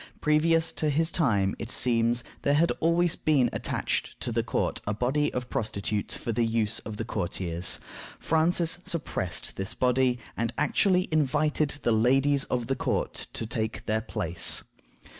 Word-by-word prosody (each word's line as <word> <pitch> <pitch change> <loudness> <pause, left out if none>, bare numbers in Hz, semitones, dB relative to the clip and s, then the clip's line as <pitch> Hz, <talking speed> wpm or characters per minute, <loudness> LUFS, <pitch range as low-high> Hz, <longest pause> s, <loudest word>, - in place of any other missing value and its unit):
Previous 160 +2 +3
to 155 - -1
his 160 +3 +1
time, 105 - +2
it 115 - -5
seems, 120 -1 +2 0.2
there 140 - +2
had 165 +3 +3
always 170 +1 +3
been 145 -5 +2
attached - - -2
to - - -1
the - - +1
court - - -1
a 105 - 0
body 135 +6 +1
of 125 -1 -3
prostitutes 105 -2 -1
for 115 - -3
the 115 +1 +1
use 115 -1 0
of 110 -1 -7
the 115 - -3
courtiers. 90 -4 -2 0.4
Francis 165 +1 +2
suppressed 145 - -3
this 95 +4 -3
body, 125 0 +2 0.2
and 115 0 -2
actually 180 +4 +2
invited 150 0 +1
the 120 - +2
ladies 135 +5 +3
of 120 -2 -1
the 135 +3 -1
court - - -2
to 115 - -4
take 110 0 -3
their 110 +1 0
place. 95 -6 -1
125 Hz, 160 wpm, -27 LUFS, 110-155 Hz, 0.4 s, Previous